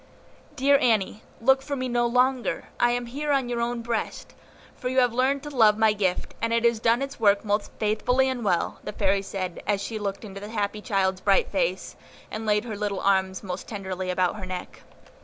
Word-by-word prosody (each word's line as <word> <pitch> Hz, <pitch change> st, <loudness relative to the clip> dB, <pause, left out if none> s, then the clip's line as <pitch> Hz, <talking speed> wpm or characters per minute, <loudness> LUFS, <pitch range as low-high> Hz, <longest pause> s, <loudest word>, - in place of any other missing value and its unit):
"Dear 280 Hz, +1 st, +4 dB
Annie, 215 Hz, -3 st, +1 dB, 0.2 s
look 265 Hz, +3 st, +4 dB
for 280 Hz, +1 st, -4 dB
me 255 Hz, -1 st, -2 dB
no 240 Hz, -1 st, +1 dB
longer; 250 Hz, +1 st, +1 dB
I 240 Hz, -, +4 dB
am 245 Hz, 0 st, -1 dB
here 290 Hz, +5 st, -3 dB
on 270 Hz, -3 st, +2 dB
your 240 Hz, -1 st, -1 dB
own 235 Hz, 0 st, -2 dB
breast, 230 Hz, -1 st, -3 dB, 0.4 s
for 250 Hz, -, -4 dB
you 260 Hz, -, -3 dB
have 245 Hz, -2 st, +4 dB
learned 265 Hz, +3 st, +1 dB
to 295 Hz, -, -7 dB
love 215 Hz, -3 st, +5 dB
my 220 Hz, -1 st, +4 dB
gift, 190 Hz, -3 st, -1 dB
and 230 Hz, -, 0 dB
it 230 Hz, 0 st, +2 dB
has 235 Hz, -1 st, +3 dB
done 230 Hz, +4 st, +2 dB
its 275 Hz, 0 st, -7 dB
work 205 Hz, -1 st, +3 dB
most 205 Hz, 0 st, 0 dB
faithfully 235 Hz, +5 st, +2 dB
and 255 Hz, -2 st, -2 dB
well," 180 Hz, -5 st, 0 dB
the 210 Hz, -, -5 dB
Fairy 195 Hz, -1 st, +1 dB
said, 185 Hz, -2 st, -5 dB
as 205 Hz, -1 st, +2 dB
she 215 Hz, +2 st, -4 dB
looked 200 Hz, +1 st, -4 dB
into 195 Hz, -1 st, -8 dB
the 205 Hz, -, -7 dB
happy 210 Hz, -1 st, -2 dB
child's 190 Hz, -4 st, 0 dB
bright -, -, +2 dB
face, -, -, -1 dB, 0.4 s
and 220 Hz, 0 st, -5 dB
laid 210 Hz, 0 st, +2 dB
her 225 Hz, -3 st, -5 dB
little 205 Hz, -2 st, -2 dB
arms 190 Hz, -1 st, +1 dB
most 185 Hz, -1 st, -5 dB
tenderly 190 Hz, -3 st, -4 dB
about 180 Hz, +2 st, +1 dB
her 195 Hz, -, -6 dB
neck. 185 Hz, -1 st, -7 dB
220 Hz, 215 wpm, -25 LUFS, 200-250 Hz, 0.4 s, love